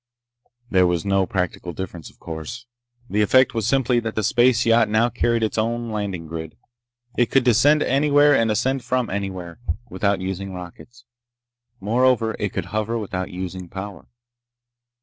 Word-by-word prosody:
There 95 -2 +4
was 90 0 -1
no 95 -1 +2
practical 90 -1 -3
difference, 90 -4 -7
of - - -23
course. 80 +9 -7 0.4
The 105 -2 0
effect 130 +4 +4
was 115 -2 -1
simply 125 -2 +2
that 115 -1 -4
the 110 - -1
space 120 +2 +3
yacht 115 -1 +4
now 110 +3 +3
carried 115 +1 0
its 110 0 -1
own 115 +1 -2
landing 100 -5 -3
grid. 80 -1 -7 0.6
It 120 - +3
could 135 - +3
descend 130 +6 +4
anywhere 145 +1 +4
and 115 -3 +2
ascend 130 +5 0
from 125 0 -1
anywhere 95 -4 -5 0.3
without 100 +1 0
using 95 +1 -4
rockets. 120 +7 -11 0.7
Moreover, 115 +2 +2
it 105 - -1
could - - -4
hover 110 +2 -1
without 95 -4 -4
using 90 -1 -6
power. 95 +2 -8
110 Hz, 155 wpm, -22 LUFS, 95-120 Hz, 0.7 s, There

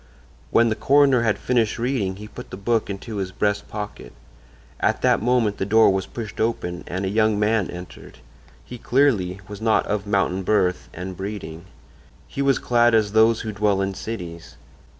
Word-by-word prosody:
When 115 0 +4
the 110 - 0
coroner 135 0 +4
had 110 -3 +1
finished 115 -4 0
reading 115 -6 -1
he 105 +2 -9
put 125 +3 -10
the - - -8
book 110 +2 0
into 100 +2 -6
his 95 -1 -3
breast 105 +1 -1
pocket. 105 - -7 0.7
At - - 0
that - - +3
moment 115 -3 +1
the - - -2
door 110 0 +5
was 95 -1 -2
pushed 110 -4 -6
open 90 -6 -2
and 95 +2 -3
a - - -1
young 110 +1 +2
man 105 -1 +1
entered. 90 +1 -10 0.5
He, 125 - -9
clearly, 110 -9 +1
was 105 +1 -9
not 110 -1 +2
of 105 -1 -2
mountain 95 -2 +1
birth 95 -2 0
and 90 +2 -7
breeding: 95 -3 -6 0.6
he 140 - -4
was 140 -1 +3
clad 120 -1 +3
as 105 -2 +2
those 110 +1 +4
who 110 - -4
dwell 100 -1 +1
in 95 0 -1
cities. 90 -6 -7
105 Hz, 180 wpm, -23 LUFS, 95-115 Hz, 0.7 s, door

